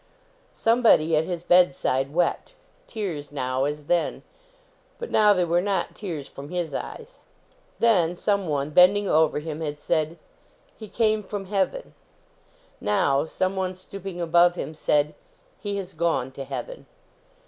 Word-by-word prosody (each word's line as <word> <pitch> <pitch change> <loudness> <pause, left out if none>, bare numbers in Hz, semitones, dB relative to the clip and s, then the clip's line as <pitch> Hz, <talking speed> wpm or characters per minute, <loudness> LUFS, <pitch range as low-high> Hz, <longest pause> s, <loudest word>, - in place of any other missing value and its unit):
Somebody 225 -9 +4
at 155 +1 +2
his 175 -1 -4
bedside 140 -6 +3
wept. 175 - -1 0.3
Tears 165 - -5
now, 130 -1 -1
as 150 0 -4
then. 175 +2 0 0.7
But 475 -1 -7
now 210 -1 +5
they 180 -3 +2
were 170 +1 +2
not 195 -2 -1
tears 165 -9 -6
from 140 +1 -10
his 175 -4 -3
eyes. 475 - -7 0.6
Then, 180 -7 +3
someone, 160 -8 -1
bending 195 +5 +5
over 160 -2 +3
him, 155 +1 -5
had 150 -2 -4
said, 155 +2 -1 0.6
"He 215 - -10
came 215 0 +1
from 200 0 -6
heaven." 200 - -2 0.9
Now, 145 -8 +1
someone, 185 +2 -2
stooping 185 0 -8
above 175 +1 +4
him, 160 - -5
said, 150 -1 +1 0.2
" - - -36
He 205 -1 -3
has 195 -1 -6
gone 160 -5 0
to 135 +1 -7
heaven." - - -7
175 Hz, 140 wpm, -25 LUFS, 150-200 Hz, 0.9 s, now